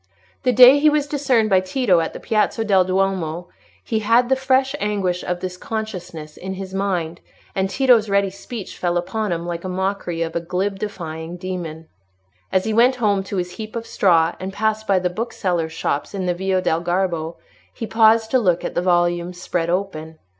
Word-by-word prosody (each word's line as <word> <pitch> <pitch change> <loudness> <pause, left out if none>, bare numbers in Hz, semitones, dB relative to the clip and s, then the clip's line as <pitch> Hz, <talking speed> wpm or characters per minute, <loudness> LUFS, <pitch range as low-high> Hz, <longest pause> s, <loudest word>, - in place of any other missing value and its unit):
The 255 - +2
day 255 +4 +8
he 305 +1 +5
was 300 -1 +1
discerned 265 -7 +1
by 190 - +6
Tito 185 -1 +2
in 165 - -2
the - - -8
Piazza 225 +1 0
del 195 -3 +4
Duomo, 185 -3 -1 0.3
he 220 - -1
had 230 +3 +3
the 265 - +4
fresh 265 0 +1
anguish 195 -4 -1
of 175 0 -3
this 185 -1 -5
consciousness 180 -9 -6
in 190 +1 -6
his 190 0 -7
mind, 180 -4 -2 0.3
and 190 0 0
Tito's 240 -2 +3
ready 200 -1 +2
speech 205 +2 -8
fell 175 -1 0
upon 210 +3 -2
him 170 0 -2
like 170 -1 -4
the 185 - -5
mockery 185 -2 -2
of 165 0 -5
a - - +1
glib, 185 +4 -2
defying 165 -4 -6
demon. 175 -3 -6 0.6
As 185 - +2
he 220 - -1
went 245 +4 +4
home 210 -5 +1
to 195 - -4
his 180 0 -2
heap 220 0 -7
of 230 0 -4
straw, 170 -6 +3
and 190 +1 -5
passed 220 +1 -1
by 195 - +3
the 180 -1 0
booksellers' 180 -6 -2
shops 155 +2 -3
in 190 -2 -2
the 180 - +1
Via 185 +1 -1
del 165 -2 +1
Garbo, 175 -2 -1 0.4
he 225 - -6
paused 225 0 +4
to 260 - +4
look 180 -6 +1
at - - -3
the - - 0
volumes 175 0 +1
spread 170 -1 -2
open. 160 -4 -3
190 Hz, 195 wpm, -21 LUFS, 175-220 Hz, 0.6 s, day